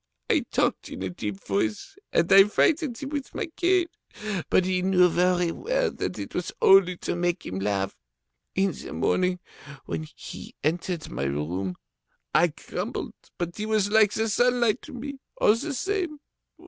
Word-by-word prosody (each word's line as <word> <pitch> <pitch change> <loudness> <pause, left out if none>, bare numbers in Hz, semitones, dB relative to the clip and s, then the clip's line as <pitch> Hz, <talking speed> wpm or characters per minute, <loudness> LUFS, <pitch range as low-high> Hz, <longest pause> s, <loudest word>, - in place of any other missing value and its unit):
I - - +2
talked - - 0
in 95 - -6
a 95 - -3
deep 100 +2 -5
voice, 105 +2 -1 0.2
and 170 +3 +3
I 195 0 +10
frightened 285 - +2
him 275 - -5
with 285 -2 -5
my 440 - -1
cane, 360 0 +3 0.6
but 185 - +4
he 185 -1 +1
knew 180 -1 +5
very 180 0 +2
well - - 0
that - - -4
it - - -6
was - - -2
only 185 -2 +6
to - - -3
make 175 +1 -1
him 95 +1 -4
laugh. 100 -1 -1 0.6
In 195 0 +2
the - - -8
morning, 180 0 +1 0.5
when 80 -1 -4
he - - -9
entered 170 +2 -1
my 70 - -2
room, 85 +7 -2 0.6
I 165 +3 +5
grumbled, 150 - -5 0.2
but 175 -1 -4
he 215 0 -3
was 215 -2 +1
like 215 -2 +5
the 220 0 0
sunlight 240 0 +2
to - - -11
me, 275 +2 -6 0.2
all 210 - +6
the 280 +8 -3
same. 355 +2 -2
185 Hz, 170 wpm, -26 LUFS, 155-245 Hz, 0.6 s, I